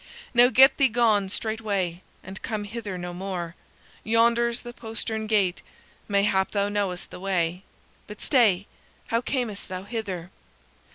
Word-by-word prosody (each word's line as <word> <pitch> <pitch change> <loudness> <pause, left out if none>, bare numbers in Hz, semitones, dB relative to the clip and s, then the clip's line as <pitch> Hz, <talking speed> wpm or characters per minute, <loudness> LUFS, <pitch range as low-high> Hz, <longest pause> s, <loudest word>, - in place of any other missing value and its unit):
Now 245 0 +7
get 265 +1 +7
thee 275 - +5
gone 220 -5 +2
straightway, 200 -5 -2 0.2
and 190 +1 -8
come 215 -3 -3
hither 205 -2 -5
no 175 0 -5
more. 175 -2 -4 0.5
Yonder 235 +2 +3
is 235 +1 -5
the 240 0 -8
postern 220 -1 -4
gate; 200 -5 +2 0.5
mayhap 200 -1 +2
thou 200 -1 0
knowest 200 -3 -2
the - - -8
way. 180 -2 0 0.5
But 210 -1 -9
stay! 210 -8 +3 0.4
How 230 +1 +1
camest 240 -6 -3
thou 185 0 -5
hither?" 195 -5 -5
205 Hz, 145 wpm, -26 LUFS, 190-230 Hz, 0.5 s, Now